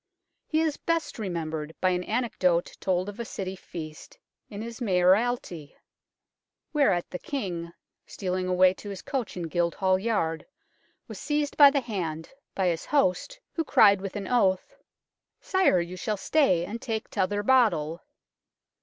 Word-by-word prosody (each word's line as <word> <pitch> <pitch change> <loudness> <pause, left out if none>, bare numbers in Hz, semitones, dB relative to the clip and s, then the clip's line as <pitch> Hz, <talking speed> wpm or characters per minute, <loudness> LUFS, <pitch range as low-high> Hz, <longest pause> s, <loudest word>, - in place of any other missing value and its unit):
He 315 0 +1
is 315 -3 0
best 330 -6 -2
remembered 160 -5 -4
by 185 - +2
an 180 0 -1
anecdote 190 -7 0
told 185 0 0
of 205 +2 -8
a - - -2
City 190 -4 -5
feast 155 -4 -9 0.3
in 205 +1 -6
his 235 +2 -8
mayoralty, 185 -4 +1 1.0
whereat 205 - +2
the 180 - -5
King, 175 -11 -4 0.4
stealing 185 -1 -3
away 185 0 +4
to 205 - -10
his 195 -2 -7
coach 255 -9 -3
in 175 - -3
Guildhall 175 +3 +1
Yard, 180 -7 -1 0.6
was - - -8
seized 295 -1 -1
by 285 -1 +9
the 280 0 0
hand 165 -9 -4 0.2
by 190 - 0
his 165 -1 -2
host, 285 - +1
who 325 - -1
cried 200 -9 +5
with 195 0 -6
an 200 -2 -4
oath, 190 -7 +1 0.4
" - - -63 0.3
Sire, 375 - +3
you 175 +1 -4
shall 210 +3 -2
stay 190 - +2
and 225 +5 -6
take 220 -4 -3
t'other 205 +1 0
bottle." 205 -10 +2
190 Hz, 155 wpm, -27 LUFS, 175-235 Hz, 1.0 s, by